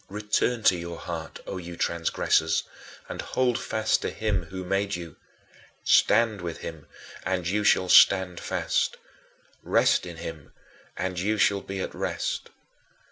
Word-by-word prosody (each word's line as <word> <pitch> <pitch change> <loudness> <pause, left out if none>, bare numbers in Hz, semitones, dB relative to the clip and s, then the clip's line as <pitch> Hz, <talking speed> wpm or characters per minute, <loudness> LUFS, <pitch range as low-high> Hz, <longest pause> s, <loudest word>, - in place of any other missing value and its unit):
Return 105 +3 0
to 95 - +5
your 85 -1 -6
heart, 85 -2 -6
O 95 - -5
you 85 -1 -8
transgressors, 80 -1 +1 0.4
and - - -5
hold 125 -2 0
fast 110 0 0
to - - -1
him 105 -5 -1
who 95 +3 -7
made 100 +2 0
you. 85 -2 -8 0.7
Stand 115 -4 +4
with 85 -2 -5
him 80 -3 -8 0.4
and 90 -1 -1
you 105 +4 0
shall 95 -2 +4
stand 90 -1 +6
fast. 485 -1 -1 0.6
Rest - - +2
in - - -8
him - - -8 0.4
and 90 -1 -2
you 105 +4 0
shall 100 -1 +3
be 95 0 -5
at - - -4
rest. - - -3
95 Hz, 145 wpm, -26 LUFS, 85-105 Hz, 0.7 s, stand